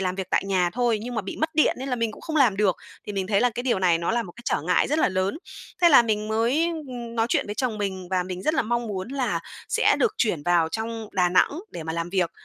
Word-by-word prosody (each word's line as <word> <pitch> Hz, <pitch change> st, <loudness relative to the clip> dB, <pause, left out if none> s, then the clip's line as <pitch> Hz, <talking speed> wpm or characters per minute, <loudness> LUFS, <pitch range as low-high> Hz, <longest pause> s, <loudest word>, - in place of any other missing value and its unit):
làm 185 Hz, -1 st, -1 dB
việc 190 Hz, -1 st, -4 dB
tại -, -, +2 dB
nhà 185 Hz, -3 st, +1 dB
thôi, 240 Hz, -2 st, +1 dB
nhưng 245 Hz, +1 st, -5 dB
mà 220 Hz, -, -1 dB
bị 190 Hz, -, -6 dB
mất 315 Hz, -, 0 dB
điện 310 Hz, -, +3 dB
nên 270 Hz, +1 st, -5 dB
là 250 Hz, -, -1 dB
mình 230 Hz, -2 st, -1 dB
cũng -, -, -13 dB
không 315 Hz, -1 st, -3 dB
làm 245 Hz, -9 st, +4 dB
được. 200 Hz, -3 st, +2 dB, 0.3 s
Thì 210 Hz, -, -4 dB
mình 190 Hz, -1 st, -2 dB
thấy 200 Hz, -1 st, +2 dB
là 245 Hz, -, +3 dB
cái 240 Hz, +2 st, -5 dB
điều 240 Hz, -7 st, +1 dB
này 175 Hz, -3 st, +3 dB
nó 170 Hz, -, -1 dB
là 235 Hz, +1 st, +1 dB
một 175 Hz, -, -10 dB
cái 240 Hz, -, -12 dB
trở 145 Hz, -, 0 dB
ngại 180 Hz, +8 st, +2 dB
rất 305 Hz, +2 st, +1 dB
là -, -, +3 dB
lớn. 190 Hz, -, -1 dB, 0.4 s
Thế 345 Hz, -, +8 dB
là 270 Hz, -6 st, +8 dB
mình 215 Hz, -1 st, -1 dB
mới, 235 Hz, +8 st, +2 dB, 0.2 s
ừm, 240 Hz, -2 st, -7 dB
nói 225 Hz, 0 st, +1 dB
chuyện -, -, +1 dB
với 205 Hz, -, -4 dB
chồng 230 Hz, -3 st, -2 dB
mình, 190 Hz, -3 st, -3 dB
và 185 Hz, -1 st, +1 dB
mình 185 Hz, 0 st, -6 dB
rất 310 Hz, -, +1 dB
là -, -, +2 dB
mong 235 Hz, +1 st, -1 dB
muốn 195 Hz, -1 st, -4 dB
là 270 Hz, -1 st, -1 dB, 0.3 s
sẽ -, -, +3 dB
được 435 Hz, -3 st, +2 dB
chuyển 175 Hz, -10 st, +1 dB
vào 170 Hz, -1 st, +2 dB
trong 225 Hz, +3 st, -4 dB
Đà 180 Hz, -1 st, +2 dB
Nẵng 180 Hz, -, +4 dB, 0.2 s
để 165 Hz, -, -7 dB
mà 160 Hz, 0 st, -4 dB
làm 170 Hz, +1 st, -3 dB
việc. 185 Hz, -3 st, +1 dB
215 Hz, 295 wpm, -25 LUFS, 185-240 Hz, 0.4 s, Thế